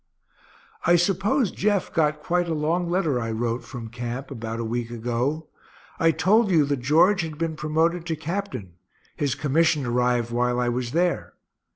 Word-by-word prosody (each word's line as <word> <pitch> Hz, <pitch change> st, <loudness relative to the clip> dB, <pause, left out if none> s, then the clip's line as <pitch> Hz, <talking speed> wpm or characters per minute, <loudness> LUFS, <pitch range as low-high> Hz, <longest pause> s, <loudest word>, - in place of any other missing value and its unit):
I 175 Hz, -, +5 dB
suppose 195 Hz, -, +2 dB
Jeff 205 Hz, -2 st, 0 dB
got 150 Hz, -1 st, +1 dB
quite 175 Hz, +1 st, +1 dB
a 160 Hz, -, 0 dB
long 165 Hz, +3 st, 0 dB
letter 165 Hz, -8 st, +1 dB
I 115 Hz, -1 st, -3 dB
wrote, 115 Hz, +2 st, -2 dB
from 115 Hz, -3 st, -8 dB
camp, 120 Hz, +3 st, -5 dB
about 115 Hz, -2 st, -5 dB
a 115 Hz, -, -2 dB
week 120 Hz, +1 st, -2 dB
ago. 120 Hz, +7 st, -2 dB, 0.5 s
I 165 Hz, -, +4 dB
told 195 Hz, +7 st, +3 dB
you 160 Hz, -5 st, +4 dB
that 140 Hz, 0 st, 0 dB
George 170 Hz, +10 st, +4 dB
had 160 Hz, -2 st, -5 dB
been 165 Hz, 0 st, -2 dB
promoted 160 Hz, +3 st, 0 dB
to 165 Hz, -, -1 dB
captain 160 Hz, -, -5 dB, 0.4 s
his 140 Hz, -4 st, -1 dB
commission 150 Hz, 0 st, +2 dB
arrived 120 Hz, -1 st, +1 dB
while 125 Hz, +1 st, +1 dB
I 120 Hz, -1 st, +1 dB
was 120 Hz, 0 st, -2 dB
there. 175 Hz, +1 st, 0 dB
150 Hz, 170 wpm, -24 LUFS, 120-170 Hz, 0.5 s, I